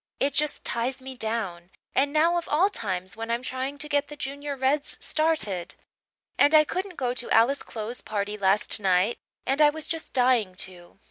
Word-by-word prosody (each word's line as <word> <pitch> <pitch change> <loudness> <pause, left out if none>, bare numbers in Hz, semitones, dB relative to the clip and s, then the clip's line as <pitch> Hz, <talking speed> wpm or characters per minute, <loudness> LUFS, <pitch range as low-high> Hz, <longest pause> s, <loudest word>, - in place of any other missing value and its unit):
It 280 0 +1
just 300 +1 0
ties 245 +3 -1
me 265 0 -8
down 215 -7 -3 0.2
and 280 +1 +2
now 320 +3 +3
of 340 - -10
all 360 +7 +3
times 185 - -3
when 225 +1 -5
I'm 235 +2 -1
trying 260 +2 -3
to 300 - -5
get 290 -1 +1
the 295 - -9
Junior 285 +1 -4
Reds 275 +3 0
started. 255 - -1 0.6
And 290 +2 +6
I 305 - +8
couldn't 370 +4 -4
go 250 -4 -1
to 250 -1 -5
Alice 240 +5 +4
Clow's 225 +2 -6
party 210 0 -3
last 200 +1 +1
night 190 +3 +2 0.3
and 275 +3 +1
I 300 - +8
was 310 +1 -4
just 325 -1 -4
dying 245 -7 +2
to. 180 -2 -7
255 Hz, 190 wpm, -26 LUFS, 210-295 Hz, 0.6 s, I